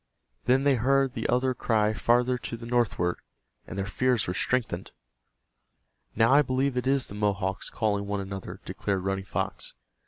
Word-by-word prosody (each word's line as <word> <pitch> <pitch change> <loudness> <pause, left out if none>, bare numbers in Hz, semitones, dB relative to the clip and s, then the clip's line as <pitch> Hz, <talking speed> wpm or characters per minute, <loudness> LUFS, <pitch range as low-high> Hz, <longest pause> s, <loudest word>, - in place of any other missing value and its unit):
Then 130 +2 +3
they 140 -1 +4
heard 135 +2 +2
the - - -3
other 130 +2 +2
cry 110 -3 +1
farther 120 +3 +2
to 115 - -5
the 115 - -9
northward, 115 -7 +1 0.5
and - - -7
their 95 - -1
fears 125 +3 +1
were 90 - -2
strengthened. 125 +5 -1 1.3
"Now 115 +2 +4
I 145 - +7
believe 135 -1 0
it 125 +1 -1
is 135 -1 +3
the - - -7
Mohawks 100 -2 -1
calling 100 -2 -1
one 100 0 -1
another," 95 -1 -6
declared 95 -2 -2
Running 95 0 -2
Fox. 95 +2 -4
115 Hz, 165 wpm, -27 LUFS, 100-125 Hz, 1.3 s, I